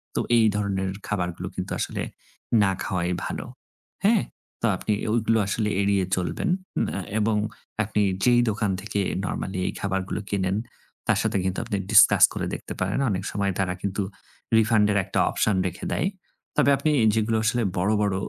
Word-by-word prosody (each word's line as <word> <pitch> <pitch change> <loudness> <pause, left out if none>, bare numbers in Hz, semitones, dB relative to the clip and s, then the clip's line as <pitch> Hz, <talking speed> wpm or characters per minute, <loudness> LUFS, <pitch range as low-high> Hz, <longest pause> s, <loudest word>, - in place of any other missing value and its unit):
তো - - +1 0.2
এই 110 - +5
ধরনের 100 -2 -1 0.2
খাবারগুলো 90 -5 -2
কিন্তু - - -4
আসলে - - -2 0.6
না 95 -1 +4
খাওয়াই 90 -1 -1
ভালো, - - -4 0.6
হ্যাঁ? 215 -1 +4 0.4
তো 115 - +2
আপনি 105 - -1 0.2
ওইগুলো 115 -1 +2
আসলে 105 +1 0
এড়িয়ে 100 -1 +2
চলবেন। 95 - -2 0.4
ম্যা 100 - -3 0.2
এবং 105 0 +2 0.5
আপনি 105 0 0 0.2
যেই 120 -1 +5
দোকান 105 -1 0
থেকে 105 0 -3 0.2
নরমালি 95 0 -3
এই - - -2
খাবারগুলো 95 +1 -2
কেনেন, 95 -1 0 0.5
তার - - +3
সাথে - - 0
কিন্তু 95 0 -1
আপনি 100 - -2
discuss 110 -1 +7
করে - - -3
দেখতে - - -7
পারেন, 95 +7 0
অনেক 95 -1 -2
সময় 100 -1 0
তারা 90 -2 +1
কিন্তু 100 +1 -2 0.6
refund 110 -1 +4
এর 100 - +2
একটা - - -1
অপশন 105 - +1
রেখে 90 - -6
দেয়। 170 - +1 0.5
তবে - - +4
আপনি 150 +3 +1 0.2
যেগুলো 110 0 +1
আসলে 120 +1 +2
বড়, 90 +3 +1
বড় 100 -2 +1
100 Hz, 165 wpm, -25 LUFS, 95-110 Hz, 0.6 s, discuss